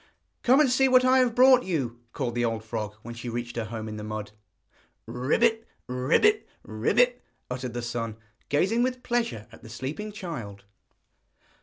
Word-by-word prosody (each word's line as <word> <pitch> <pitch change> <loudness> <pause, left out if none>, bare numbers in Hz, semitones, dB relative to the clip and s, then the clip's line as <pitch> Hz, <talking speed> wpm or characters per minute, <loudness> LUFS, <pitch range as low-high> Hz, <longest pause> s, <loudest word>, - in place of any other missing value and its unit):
'Come 260 +3 +5
and 300 - +5
see 265 +1 +4
what 255 -1 +5
I 260 +1 +5
have 245 -3 +2
brought 255 0 +7
you,' 135 - -3
called 125 -4 -3
the 120 0 0
old 115 -1 -1
frog, 110 -2 -4
when 120 - -7
she 115 +1 -6
reached 120 0 -4
her 115 -2 -2
home 110 0 -6
in 110 0 -6
the 105 - -6
mud. 105 -1 -5 0.8
'Croak! 125 - -1 0.5
croak! 125 - +1 0.4
croak!' 245 - +2 0.3
uttered 125 -1 -4
the 120 - -3
son, 115 -2 -4 0.3
gazing 190 +11 +2
with 255 0 -1
pleasure 230 - -1
at 115 - -15
the 110 - -12
sleeping 140 - -5
child. 135 - -7
125 Hz, 170 wpm, -27 LUFS, -, 0.8 s, brought